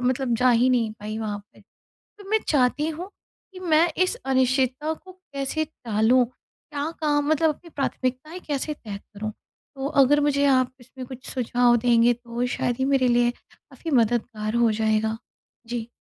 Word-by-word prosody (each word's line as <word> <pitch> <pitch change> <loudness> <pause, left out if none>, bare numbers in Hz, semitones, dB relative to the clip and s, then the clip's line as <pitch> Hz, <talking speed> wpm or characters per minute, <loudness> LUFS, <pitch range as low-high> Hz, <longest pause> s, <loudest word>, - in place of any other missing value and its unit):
मतलब 250 -1 0
जा 250 +2 +4
ही 245 +2 +4
नहीं 230 -4 +1
पाई 215 +1 -5
वहाँ 210 -2 -3
पे। - - -19 0.6
तो 400 -1 -12
मैं 440 0 +3
चाहती 290 +2 +2
हूँ 345 +5 -6 0.4
कि 370 - -9
मैं 335 -1 +3 0.2
इस 370 +6 -1
अनिश्चितता 260 +3 +1
को 370 +4 -14
कैसे 315 -4 -4 0.2
टालूँ? 230 +3 +3
क्या 285 +4 -8
काम 290 -1 +1
मतलब 315 +1 +3
अपनी 340 - -16
प्राथमिकताएँ 275 +3 -3
कैसे 295 +1 -2
तय 210 -8 -8
करूँ? 215 +1 -7 0.4
तो 270 0 -3
अगर 290 +3 +5
मुझे 285 -1 +2
आप 255 -2 +3
इसमें 255 +1 -10
कुछ 260 0 -9
सुझाव 245 -1 +3
देंगे 235 0 +4
तो 240 +1 -4
शायद 245 - 0
ही 265 - +1
मेरे 270 -2 +3
लिए 240 0 +3
काफ़ी 325 +6 -11
मददगार 225 -3 +1
हो 225 - +4
जाएगा 220 0 +1 0.5
जी। 235 -1 -4
255 Hz, 165 wpm, -24 LUFS, 235-290 Hz, 0.6 s, अगर